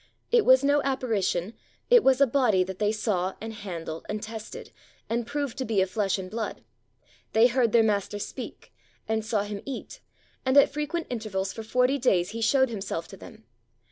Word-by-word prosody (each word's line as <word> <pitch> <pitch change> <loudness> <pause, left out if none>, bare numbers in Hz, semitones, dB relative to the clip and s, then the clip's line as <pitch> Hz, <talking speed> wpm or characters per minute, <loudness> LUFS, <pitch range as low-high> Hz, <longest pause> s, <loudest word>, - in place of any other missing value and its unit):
It 475 -2 +4
was 260 +1 +6
no 285 +1 +3
apparition, 225 -8 -1 0.4
it 485 -4 +7
was 265 -1 +4
a 280 - +7
body 235 -8 +2
that 185 0 -7
they 210 0 +2
saw 195 -4 -1
and 225 +1 -6
handled 170 -6 -6
and 210 - -2
tested 220 0 -8 0.4
and 235 0 -2
proved 285 -3 -3
to - - 0
be 220 -4 0
of 190 0 +1
flesh 205 -3 0
and 190 -1 -6
blood. 220 +3 -5 0.7
They 225 +2 +6
heard 245 -2 +3
their 230 0 +5
Master 205 -1 0
speak, 205 - -8 0.3
and 220 0 0
saw 215 -2 0
Him 205 -1 -6
eat; 275 -2 -7 0.4
and 260 +1 +2
at 280 - +7
frequent 300 +3 -2
intervals 200 -5 -3
for 225 - -6
forty 250 +5 +1
days 185 -9 +2
He 230 +1 -5
showed 265 +3 +3
Himself 195 -6 -4
to 195 - -11
them. - - -13
220 Hz, 190 wpm, -27 LUFS, 200-260 Hz, 0.7 s, it